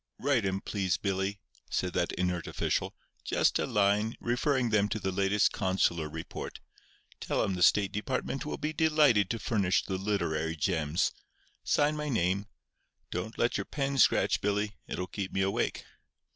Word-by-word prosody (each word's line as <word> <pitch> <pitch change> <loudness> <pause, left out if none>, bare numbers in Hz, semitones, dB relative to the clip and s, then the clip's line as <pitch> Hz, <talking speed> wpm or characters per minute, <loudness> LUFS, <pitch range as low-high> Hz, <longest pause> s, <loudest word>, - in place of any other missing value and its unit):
"Write 130 -6 +1
'em, 95 0 -1
please, 95 -5 -1
Billy," 95 0 -1 0.3
said - - -1
that - - 0
inert 90 -2 -1
official, - - -1 0.3
"just - - +2
a - - 0
line, 105 +2 +2
referring 125 0 +1
them 105 -1 +3
to 110 - -2
the 95 -1 -2
latest 100 +2 +2
consular 95 -5 0
report. 80 +1 -7 0.6
Tell - - 0
'em 95 - 0
the 90 - -4
State 100 +2 +4
Department 130 +5 -2
will 150 - -4
be 155 +1 -3
delighted 150 - +4
to 115 - -1
furnish 100 -5 +1
the 95 -1 -3
literary 80 -6 -1
gems. 80 0 0 0.5
Sign 150 +1 +2
my 150 0 -3
name. 100 -3 0 0.6
Don't 90 +6 -4
let 120 - +1
your - - -3
pen 140 -2 -2
scratch, - - +4
Billy; 105 +1 0
it'll 90 - -3
keep 95 +1 -5
me 95 - 0
awake." 95 +1 -1
100 Hz, 160 wpm, -30 LUFS, 95-120 Hz, 0.6 s, State